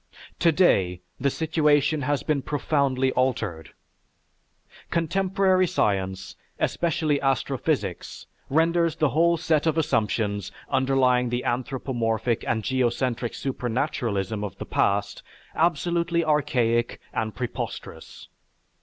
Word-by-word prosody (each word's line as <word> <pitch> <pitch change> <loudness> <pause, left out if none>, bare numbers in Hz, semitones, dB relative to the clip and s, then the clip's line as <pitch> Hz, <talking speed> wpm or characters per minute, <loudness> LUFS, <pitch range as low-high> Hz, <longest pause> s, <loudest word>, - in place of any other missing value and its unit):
Today 145 - +3 0.2
the 140 - +2
situation 150 -1 +2
has 145 +1 -1
been 150 -3 0
profoundly 135 -2 0
altered. 105 -12 -1 1.2
Contemporary 185 +2 +2
science, 95 - -1 0.2
especially 155 -3 0
astrophysics, 135 -2 -1 0.2
renders 165 +2 +2
the 155 - +2
whole 170 +3 +3
set 160 -1 +1
of 160 0 +1
assumptions 110 - 0 0.2
underlying 130 -2 +2
the 120 +1 -2
anthropomorphic 120 -2 -1
and 110 -2 0
geocentric 125 -1 -1
supernaturalism 115 -6 -2
of 100 - -6
the - - -6
past 100 0 0 0.3
absolutely 170 +1 +1
archaic 125 -6 +1
and 110 -1 -2
preposterous. 125 -2 -6
135 Hz, 95 wpm, -25 LUFS, 115-160 Hz, 1.2 s, Today